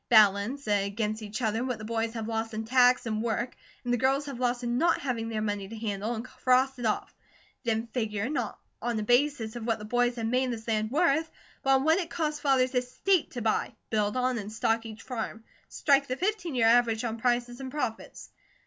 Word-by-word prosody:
Balance 215 +5 +4
against 210 +2 0
each 215 +3 -5
other 220 +2 +1
what 250 -3 -2
the 215 - -8
boys 225 0 -1
have 220 -1 -3
lost 225 0 -2
in 220 +1 -3
tax 250 +1 +4
and 215 -1 -1
work, 235 +2 -2 0.3
and 245 -1 0
the 245 - +1
girls 270 +3 +2
have 275 -4 -6
lost 245 0 0
in 240 +1 0
not 340 +2 +3
having 230 -4 -2
their 215 -1 -2
money 205 -2 -2
to 225 +3 -8
handle, 215 +1 -2
and 225 +2 -5
cross 255 +1 +2
it 235 - 0
off. 215 - -1 0.5
Then 225 0 0
figure, 220 -2 -2
not 290 - -2 0.2
on 240 -1 -1
a - - -2
basis 245 -1 +2
of 235 -1 -5
what 230 - +1
the 210 - -8
boys 245 +2 +1
have 230 -2 -3
made 250 +2 +1
this 225 -1 -6
land 215 -1 0
worth, 315 +2 +2 0.3
but 270 0 +4
on 265 - +2
what 320 +4 +4
it 340 -3 -3
cost 305 -3 -2
Father's 260 -2 +3
estate 255 +9 +1
to 245 -3 -4
buy, 225 +1 0 0.2
build 210 +1 +1
on, 255 -1 +1
and 205 0 -6
stock 225 0 0
each 220 0 -10
farm. 225 -3 -5 0.3
Strike 280 -1 +3
the 255 - -2
fifteen 370 -5 -1
year 235 -2 +3
average 230 -1 +4
on 230 -1 -3
prices 240 +1 0
and 265 -1 -5
profits. 255 -5 -5
240 Hz, 220 wpm, -28 LUFS, 220-255 Hz, 0.5 s, Balance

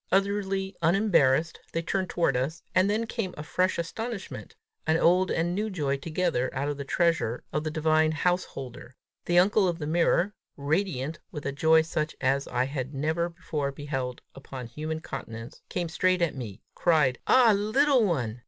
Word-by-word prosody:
Utterly 195 0 0
unembarrassed 165 -5 +3
they 165 - -1
turned 185 +2 -1
toward 165 -6 +1
us 135 +6 -2
and 185 +2 +4
then 220 +2 0
came 220 -5 -4
a 150 - -5
fresh 185 +4 0
astonishment, 220 +4 -5 0.3
an 160 0 +4
old 180 +3 +4
and 170 +2 0
new 210 +4 -1
joy 145 -8 -1
together 155 -4 -1
out 140 +2 -1
of 145 -1 -2
the 140 - -4
treasure 165 -6 0
of 150 - 0
the 155 - -2
divine 155 0 +2
house 180 +3 +1
holder: 125 -1 -9 0.3
the 175 - +2
uncle 195 +2 +5
of 170 -2 -1
the 155 - -5
mirror, 170 +5 +2 0.2
radiant 155 -1 -1
with 150 -2 -7
a 140 - 0
joy 160 +3 +4
such 155 -1 -2
as 135 +1 +1
I 125 - 0
had 135 0 -4
never 160 +5 0
before 160 -5 -3
beheld 135 -3 -4
upon 135 -2 -8
human 155 +6 -5
countenance, 115 -4 -8
came 175 -2 -2
straight 185 +3 +2
to 170 -3 +1
me, 115 -6 -8
cried; 150 -7 +2
"Ah, 240 -4 +6
little 250 +6 +3
one!" 125 - -1
160 Hz, 175 wpm, -27 LUFS, 140-185 Hz, 0.3 s, Ah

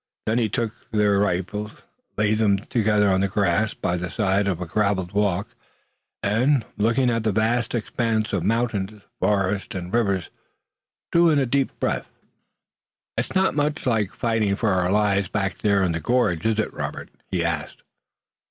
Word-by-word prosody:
Then 110 +3 +1
he 110 -2 +1
took 115 +2 -4
their 105 -2 +2
three - - +2
rifles, 105 +3 -2 0.5
laid 105 0 +2
them 100 -3 +3
together 105 -1 +2
on 95 0 +2
the 100 - +2
grass 100 +2 +1
by 90 - -1
the 90 +1 -4
side 100 -2 +1
of 90 -4 -1
a 90 - -3
graveled 95 -1 0
walk 100 -1 0 0.7
and, 120 +4 +2
looking 115 +4 +2
at 115 -1 0
the 110 0 +1
vast 115 +4 0
expanse 110 -1 -1
of 95 - +1
mountain, 110 -3 -1 0.2
forest 100 -1 0
and 90 0 -5
river, 100 -6 +1 0.9
drew 170 0 +5
a 145 -4 +3
deep 135 +2 -1
breath. - - -1 1.1
"It's - - -3
not 190 0 +3
much 150 0 -1
like 110 -6 +1
fighting 110 -4 0
for 110 +1 0
our 90 -1 +1
lives 100 -2 +2
back 95 -2 -2
there 100 -2 +2
in 90 - +1
the 85 - -2
gorge, 90 -2 +1
is 110 -1 +1
it, 110 - -1
Robert?" - - -5 0.2
he 85 -3 -1
asked. 80 -3 -3
105 Hz, 170 wpm, -23 LUFS, 95-115 Hz, 1.1 s, drew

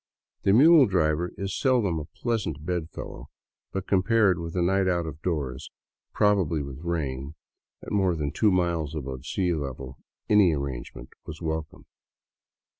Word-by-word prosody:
The 95 - +3
mule 145 +5 +7
driver 85 -2 +1
is 100 0 -3
seldom 115 - +2
a 75 - -6
pleasant 80 - -3
bed 90 -3 -2
fellow, - - -9 0.4
but 95 -1 -3
compared 95 -1 +3
with 85 +1 -6
a 90 - +1
night 95 +2 +2
out 85 -2 +1
of 80 -1 -7
doors, 70 -7 -3 0.4
probably 95 -7 +2
with 70 -1 -8
rain, 75 -4 -3 0.5
at - - -8
more 95 -4 +2
than 75 -3 -2
two 110 - +3
miles 85 -4 0
above 65 -2 -6
sea 90 -1 0
level, 70 -3 -5 0.3
any 105 -5 +5
arrangement 70 -3 -6 0.2
was 75 - -7
welcome. 80 -2 -4
85 Hz, 150 wpm, -26 LUFS, 75-95 Hz, 0.5 s, mule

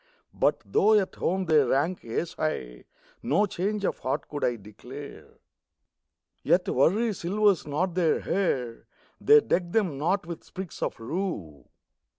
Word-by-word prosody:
But - - +1
though 210 - +4
at 190 - -3
home 190 +1 -1
they 160 -3 +4
rank 145 +6 +1
ace 140 +9 -3
high, 65 - -4 0.4
No 205 - +2
change 200 +2 -2
of - - -1
heart 130 - -2
could 145 -1 -5
I 120 - +2
declare. 125 +7 -11 1.1
Yet - - +2
worry 210 - +2
silvers 195 -1 +1
not 170 +5 -1
their 170 -3 +1
hair; 130 -11 -1 0.3
They 445 +1 +6
deck 175 - -1
them 180 -11 0
not 180 +5 0
with 170 -1 -7
sprigs 190 -2 -8
of - - -2
rue. 115 - -4
170 Hz, 145 wpm, -27 LUFS, 135-195 Hz, 1.1 s, They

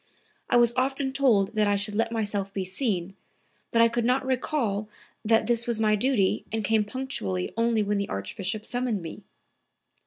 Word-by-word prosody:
I - - +4
was 240 -1 +4
often 265 +1 0
told 245 -8 +2
that 215 -1 +2
I 205 - +2
should 205 +1 -2
let 225 +2 0
myself 205 -3 -2
be 195 -1 -3
seen, 190 -2 -1 0.5
but 230 0 +4
I - - +6
could 235 +1 -1
not 255 +3 +1
recall 245 -6 -1 0.3
that 225 0 +3
this 235 +1 +1
was 235 -2 +2
my 215 -1 +3
duty 210 -4 +1
and 220 0 -2
came 220 +1 +2
punctually 205 - -3
only 230 -1 +2
when 205 0 0
the 200 - -3
Archbishop 195 - -3
summoned 245 -6 -1
me." 165 - -9
220 Hz, 180 wpm, -26 LUFS, 200-240 Hz, 0.5 s, I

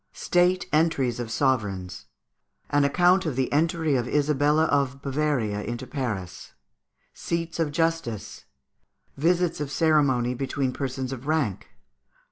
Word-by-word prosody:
State 180 +1 +2
Entries 140 -7 +1
of 120 -2 -4
Sovereigns. 105 -7 -1 0.6
An 145 0 +3
Account 180 +5 +3
of 145 - -2
the 130 +1 -1
Entry 160 -1 +1
of 125 -2 0
Isabel 150 +1 +2
of 140 -4 +1
Bavaria 135 -7 -1
into 120 +4 -5
Paris. 115 - -5 0.6
Seats 170 0 -4
of 160 -3 0
Justice. 155 - -2 0.7
Visits 170 +3 +1
of 150 -2 -3
Ceremony 140 -6 +2
between 130 0 -2
Persons 130 -1 -3
of 135 +2 -8
rank. 150 - -1
140 Hz, 120 wpm, -25 LUFS, 125-160 Hz, 0.7 s, An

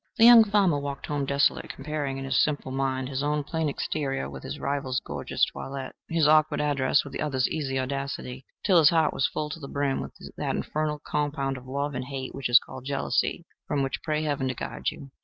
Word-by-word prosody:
The 225 - +7
young 235 -1 +10
farmer 200 -8 +3
walked 140 -1 -5
home 145 -2 -2
desolate, 140 +1 +2
comparing 140 -1 -3
in 135 - -5
his 135 -1 +3
simple 145 -3 -2
mind 130 -1 -1
his 135 0 -3
own 150 0 0
plain 160 +1 -1
exterior 140 - -2
with 70 -1 -8
his - - -6
rival's 140 -2 -1
gorgeous - - -1
toilet, 135 -1 -6 0.2
his 165 -2 +3
awkward 155 0 +4
address 145 -1 +2
with 140 - -10
the - - -4
other's 135 -4 +1
easy 135 -4 -2
audacity, 135 -1 -4 0.2
till 185 -4 +6
his 155 -2 +7
heart 160 -2 +3
was 135 - +2
full 150 0 -4
to 165 - -6
the 140 - -7
brim 140 -1 -1
with - - -7 0.2
that - - -1
infernal 150 -1 -2
compound 145 -2 -1
of 130 0 -10
love 140 +2 -2
and 125 -1 -3
hate 130 -1 -5
which 135 -2 -3
is 120 - +9
called 130 +1 -4
jealousy, 140 0 0 0.2
from 140 -1 0
which 135 - -3
pray 155 -1 -1
Heaven 145 -3 -1
to 130 - -2
guard - - -3
you. 140 -1 -10
140 Hz, 215 wpm, -27 LUFS, 135-150 Hz, 0.2 s, young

